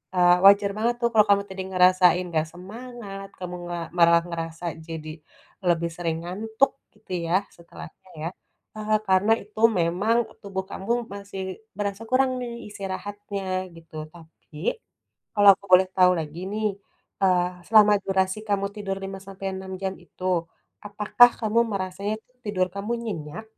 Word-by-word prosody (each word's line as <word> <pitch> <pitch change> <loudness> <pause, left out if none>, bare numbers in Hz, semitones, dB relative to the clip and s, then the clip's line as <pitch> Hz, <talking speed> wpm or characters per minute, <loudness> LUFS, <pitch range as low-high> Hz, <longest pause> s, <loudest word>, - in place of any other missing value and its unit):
eee, 175 0 +6
wajar 200 0 +7
banget 235 +2 +1
tuh 235 - +3
kalau 215 -2 +6
kamu 200 0 +4
tadi 190 0 -5
ngerasain 180 -1 +5
nggak 160 -1 0
semangat, 200 +1 -9
kamu 180 -1 -5
nga 175 0 -3 0.2
marah 170 0 +6
ngerasa 165 0 -5 0.2
jadi 160 -1 -6 0.6
lebih 170 -1 +2
sering 165 -2 -1
ngantuk 220 +8 +1 0.2
gitu 210 -2 -18 0.2
ya 175 - +2 0.2
setelahnya 170 +1 -13
ya. 165 - -2 0.5
Eee, 215 0 +1
karena 190 +4 +4
itu 215 +1 -13 0.2
memang 185 +8 +2 0.2
tubuh 190 -1 -4
kamu 195 +4 -4 0.2
masih 200 -1 -7 0.4
berasa 200 +1 -3
kurang 260 0 +3
nih 240 -1 -5 0.2
istirahatnya 195 -1 -4
gitu. 165 -1 -15 0.2
Tapi 160 -2 -16 0.8
kalau 205 0 +6
aku 200 - -23
boleh 185 +1 +8
tau 180 -1 +6
lagi 155 +1 -5
nih, 215 0 -1 0.6
eee, 180 -2 +4 0.2
selama 210 -2 +7
durasi 190 +1 +1
kamu 200 -1 +1
tidur 195 -2 -3
5 195 0 -6
sampai 195 0 -7
6 190 0 -7
jam 190 0 -1
itu, 180 +1 -13 0.6
apakah 210 +4 +5
kamu 225 +1 +2
merasanya 195 +2 -2
tuh 250 - -37
tidur 190 -3 0
kamu 205 +4 -3
nyenyak 170 -1 -5
195 Hz, 150 wpm, -25 LUFS, 180-210 Hz, 0.8 s, boleh